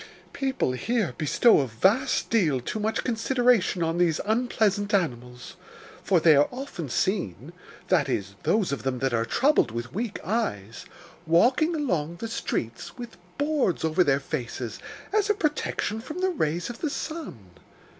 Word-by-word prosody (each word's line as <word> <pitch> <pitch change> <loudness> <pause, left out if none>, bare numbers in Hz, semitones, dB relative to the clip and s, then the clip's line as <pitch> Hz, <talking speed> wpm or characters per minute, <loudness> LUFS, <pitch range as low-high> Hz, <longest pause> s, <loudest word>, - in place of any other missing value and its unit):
People 265 - -1
here 215 - -1
bestow 170 - +4
a 135 - 0
vast 195 - +1
deal 165 - +2
too 125 - -4
much 220 +1 -1
consideration 240 -5 +2
on 165 +1 -1
these 165 -3 +2
unpleasant 215 -3 +1
animals, 125 -2 -3 0.5
for 185 -3 +3
they 160 -1 +6
are 145 +1 +5
often 245 - -6
seen 145 - -2 0.4
that 155 -7 +3
is, 100 -5 -2
those 210 -6 +1
of 140 - -3
them 130 -1 -2
that 135 0 -1
are 115 0 +1
troubled 270 - +3
with 120 +3 -6
weak 220 +1 -3
eyes 115 - -3 0.4
walking 255 - +3
along 175 - -1
the 225 +7 -5
streets 115 - -4
with 240 -5 -9 0.2
boards 290 - 0
over 160 +3 +3
their 140 -3 +2
faces, 125 -5 -5 0.3
as 425 -1 +2
a 420 - +3
protection 300 - -1
from 305 +7 -8
the 375 0 +1
rays 170 - -1
of 240 - -12
the 310 - -1
sun. 285 - -6
185 Hz, 155 wpm, -26 LUFS, -, 0.5 s, they